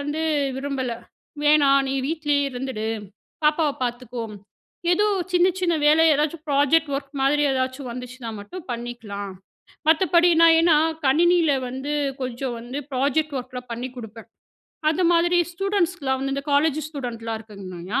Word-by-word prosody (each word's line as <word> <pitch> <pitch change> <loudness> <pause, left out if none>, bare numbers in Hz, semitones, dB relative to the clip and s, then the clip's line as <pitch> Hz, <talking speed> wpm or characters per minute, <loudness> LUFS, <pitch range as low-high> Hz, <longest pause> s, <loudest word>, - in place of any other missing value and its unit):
வந்து 290 +2 -3 0.4
விரும்பல, 270 -2 -3 0.5
"வேணாம் 280 -2 +5
நீ 270 - -1
வீட்லயே 295 -3 0
இருந்துடு 245 -4 -4 0.6
பாப்பாவ 300 0 +3
பார்த்துக்கோ 240 -1 -4 0.7
ஏதோ 410 +4 +3 0.3
சின்ன 355 0 +4
சின்ன 355 -2 +1
வேலை 310 +2 +6
எதாச்சும் 300 +2 0
ப்ராஜெக்ட் 290 +3 +3
ஒர்க் 275 0 -7
மாதிரி 290 +2 +3
ஏதாச்சும் 260 0 -2
வந்துச்சுனா 250 -1 -7
மட்டும் 345 - -9
பண்ணிக்கலாம்" 230 -5 -5 0.6
மத்தபடி 340 +1 +4
நான், 330 -1 +7
ஏன்னா 330 -2 +5 0.3
கணினியில 335 +2 +4 0.2
வந்து 265 +4 -4 0.3
கொஞ்சம் 250 0 -3
வந்து 240 +4 -6
ப்ராஜெக்ட் 285 +3 0
ஒர்க்லாம் 250 -1 -9
பண்ணி 240 +2 -4
குடுப்பேன். 225 -1 -10 0.6
அந்த 325 +4 +1
மாதிரி 345 +1 +3
ஸ்டூடண்ட்ஸ்க்குலாம் 355 -7 0
வந்து 275 0 -2
இந்த 275 - -4
காலேஜ் 300 +1 +3
ஸ்டூடண்ட்லாம் 230 -6 -5
இருக்காங்கயா 195 -2 -5
275 Hz, 130 wpm, -23 LUFS, 245-315 Hz, 0.7 s, நான்